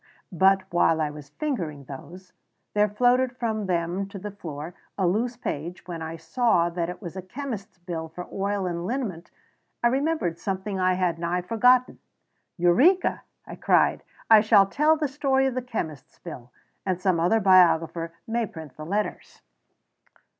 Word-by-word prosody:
But 190 +1 +4
while 165 -2 +3
I 150 -1 0
was 150 -1 -11
fingering 165 - -3
those, 175 +8 -11 0.4
there 210 0 +3
floated 250 +4 +2
from 220 -4 -2
them 175 +2 -1
to 200 - -8
the 205 +2 -6
floor 160 -4 -7 0.2
a 190 - +1
loose 230 +7 0
page, 170 -5 -5
and - - -30
when 170 -2 -5
I 160 +1 -5
saw 180 -5 +1
that 170 0 -2
it 180 +4 -8
was 175 -1 -7
a 190 - -4
chemist's 220 -1 -7
bill 170 -2 -5
for 180 +3 -8
oil 200 0 -1
and 175 0 -3
liniment 205 -10 -3 0.5
I 240 - +5
remembered 265 - 0
something 195 0 -3
I 185 0 +3
had 180 -2 0
nigh 175 +1 -1
forgotten. 250 +5 +3 0.6
"Eureka!" 255 - +4 0.2
I - - -8
cried. - - +3 0.3
"I 220 -2 +8
shall 210 -2 +6
tell 300 +10 +2
the 305 -1 0
story 270 -1 +1
of 265 - 0
the 255 - -2
chemist's 160 - -6
bill, 125 -8 -10 0.3
and 185 -2 -1
some 185 -2 +1
other 180 +7 +3
biographer 170 -4 +4
may 230 0 -1
print 160 -9 -11
the 155 - -7
letters." 205 +4 -3
185 Hz, 170 wpm, -25 LUFS, 170-230 Hz, 0.6 s, I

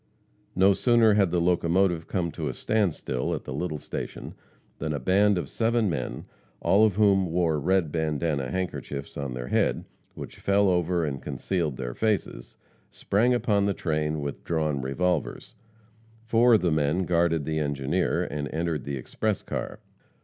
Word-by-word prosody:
No 95 +2 +5
sooner 115 0 +4
had 100 -3 +3
the 85 +1 +1
locomotive 85 0 +1
come 85 -3 -1
to 80 -2 -4
a 65 - -5
standstill 90 - -1
at - - -7
the - - -6
little 75 +2 -3
station, - - -6 0.5
than 75 0 -2
a 70 - -2
band 100 +8 +3
of 90 - -3
seven 115 -3 +1
men, 65 -6 -4 0.3
all 100 +3 +4
of 105 -4 +3
whom 100 -3 +3
wore 85 -2 +1
red 90 0 +1
bandana 75 -4 -1
handkerchiefs 75 -5 -4
on 70 -3 -4
their - - -5
heads, - - +1 0.3
which - - -9
fell 100 0 +3
over 90 -1 +1
and 70 -3 -4
concealed 85 -8 -2
their - - -4
faces, 105 - -2 0.3
sprang 120 +5 +1
upon 105 -4 +1
the 100 -1 0
train 75 -2 -1
with 70 -1 -5
drawn 75 -4 -1
revolvers. 80 +4 -2 0.7
Four 115 +1 +5
of - - +2
the 90 -2 +1
men 75 +4 +1
guarded 85 -3 +1
the 80 +1 -1
engineer, 70 +4 0
and 75 -1 -4
entered 80 -3 -2
the 70 -1 -3
express 105 - -2
car. - - -5
85 Hz, 165 wpm, -26 LUFS, 75-100 Hz, 0.7 s, No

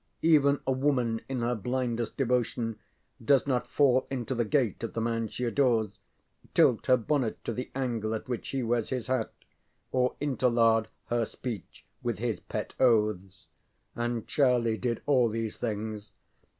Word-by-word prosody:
Even 145 -3 +5
a 135 - +1
woman 130 -4 +1
in 130 -2 -2
her 120 +1 +1
blindest 120 0 -2
devotion 120 -3 0 0.4
does 135 +2 +4
not 130 -3 0
fall 130 -3 +3
into 130 -1 -3
the 120 -1 +1
gait 120 -2 0
of 115 - -4
the - - -2
man 115 0 -1
she 125 - -5
adores, 120 -3 +2 0.7
tilt - - +4
her 130 - +6
bonnet 125 -1 -1
to 115 - -3
the 125 +3 -5
angle 115 -5 -1
at 110 - -6
which 125 -2 -4
he 135 -2 -1
wears 115 -1 0
his 130 -3 -2
hat, 130 -3 -1 0.6
or 125 -1 +1
interlard 115 -5 +2 0.2
her 120 0 +1
speech 115 -3 -7 0.2
with - - -2
his - - -2
pet - - -5
oaths. 105 -6 +2 0.5
And 120 -1 -2
Charlie 120 -5 +2
did 120 -2 -2
all 130 -5 +4
these 110 -1 -3
things. 110 -2 -4
120 Hz, 160 wpm, -29 LUFS, 115-130 Hz, 0.7 s, her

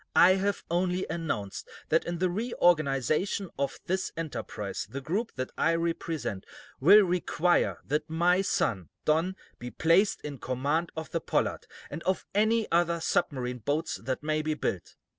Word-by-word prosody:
"I 180 - +8
have 200 +1 -1
only 180 +1 +1
announced 130 - -4 0.2
that - - +3
in 175 0 -3
the 185 +2 +2
reorganization 175 - +1
of 140 - -2
this 185 +1 -1
enterprise 140 -10 -4
the 140 - -5
group 195 - -2
that 130 -1 -4
I 165 - +3
represent 160 - -2 0.4
will 200 +9 +8
require 175 -1 +1
that 150 +3 -1
my 175 +3 +3
son, 95 - 0 0.2
Don, 165 +5 +2 0.2
be 125 - -6
placed 170 +9 +3
in 145 -3 -7
command 145 +7 -1
of 160 0 -6
the 165 - -1
'Pollard,' - - -1 0.2
and - - -5
of 190 0 -1
any 220 +2 +3
other 170 0 +2
submarine 125 -5 -1
boats 145 +7 -1
that 130 +4 -4
may 155 0 0
be 155 0 -1
built. 95 - -3
165 Hz, 155 wpm, -29 LUFS, 140-180 Hz, 0.4 s, I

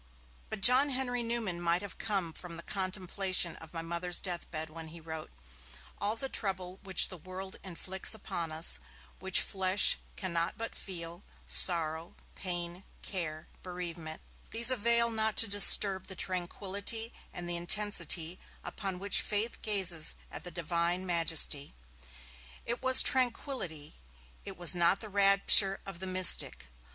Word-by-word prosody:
But 215 -2 -6
John 255 +6 +7
Henry 250 -2 -2
Newman 230 -7 -3
might 175 +2 0
have 200 - -10
come 190 -6 -3
from 170 -1 -7
the 170 - -7
contemplation 185 -2 -2
of 160 - -14
my 165 -1 -7
Mother's 170 +1 -1
death 175 -3 -5
bed 160 -1 -4
when 165 0 -9
he 165 +2 -11
wrote: 160 -1 -9 0.7
'All 210 +2 -2
the 270 +4 -5
trouble 190 -6 -5
which 190 -2 +4
the 185 - -9
world 185 +3 -9
inflicts 190 +3 -1
upon 170 -6 -6
us, 160 +2 +3
and - - -24 0.4
which 190 0 +5
flesh 190 0 +3 0.2
cannot 170 -3 -3
but 230 0 -6
feel, 170 -2 -7 0.2
sorrow, 165 -1 +2 0.2
pain, 175 0 -6 0.2
care, 155 -5 -5 0.2
bereavement, 170 -3 -7 0.3
these 235 +3 +6
avail 235 0 +2
not 220 -1 -1
to 225 - +6
disturb 200 -1 +5
the 190 - -7
tranquillity 200 +5 -4 0.2
and 175 -1 -8
the 175 - -3
intensity 175 -2 0 0.3
with 195 -2 -5
which 195 +2 +4
faith 215 +3 -3
gazes 185 -7 -2 0.2
at - - -7
the 180 - -7
Divine 170 +2 -2
Majesty.' 165 - 0 0.9
It 235 +1 -4
was 260 0 +6
'tranquillity', 230 - 0 0.5
it 195 - -8
was 175 0 +4
not 175 +2 +1
the 215 - -8
rapture 195 0 +5
of 195 -3 -9
the 190 - -6
mystic. 185 - +3
185 Hz, 145 wpm, -30 LUFS, 170-205 Hz, 0.9 s, John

